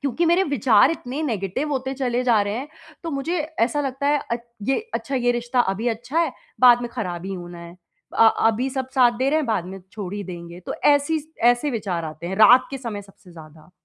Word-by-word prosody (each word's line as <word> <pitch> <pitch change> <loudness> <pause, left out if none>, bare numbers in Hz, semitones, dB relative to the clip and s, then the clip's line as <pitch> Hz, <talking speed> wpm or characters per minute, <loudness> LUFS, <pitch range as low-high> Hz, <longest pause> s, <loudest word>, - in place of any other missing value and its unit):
क्योंकि 280 +5 0
मेरे 345 +3 +4
विचार 250 - +4
इतने 295 -2 -4
नेगेटिव 225 +2 -2
होते 265 0 -2
चले 250 -2 -1
जा 230 -4 +4
रहे 205 +1 -3
हैं 270 +5 -5 0.3
तो 330 - -4
मुझे 310 +6 -2 0.2
ऐसा 255 +6 +2
लगता 275 0 -3
है 290 0 +2
अच 235 - -1 0.3
ये 270 - +2 0.2
अच्छा 275 - -3
ये 245 -2 +2
रिश्ता 240 +1 0
अभी 215 +2 0
अच्छा 240 +7 -3
है 330 -5 +1 0.3
बाद 245 -1 +7
में 240 - -5
खराब 180 -7 -4
ही 195 - -4
होना 175 -1 -9
है। 170 +1 -11 0.4
अ 225 - +7 0.2
अभी 225 +4 +1
सब 260 -1 -3
साथ 245 -3 +5
दे 265 +1 +1
रहे 310 - +3
हैं 305 - -2
बाद 220 -6 0
में 190 +1 -8
छोड़ 200 -3 -6
ही 205 - -4
देंगे। 170 -1 -9
तो - - -3
ऐसी 290 +2 +3
स 300 - -11 0.2
ऐसे 245 +5 0
विचार 190 -8 -3
आते 155 +2 -7
हैं 190 +2 -4
रात 245 +4 +7
के 270 - -5
समय 225 -5 -6
सबसे 195 -2 -19
ज़्यादा। 155 0 -15
240 Hz, 230 wpm, -22 LUFS, 195-275 Hz, 0.4 s, बाद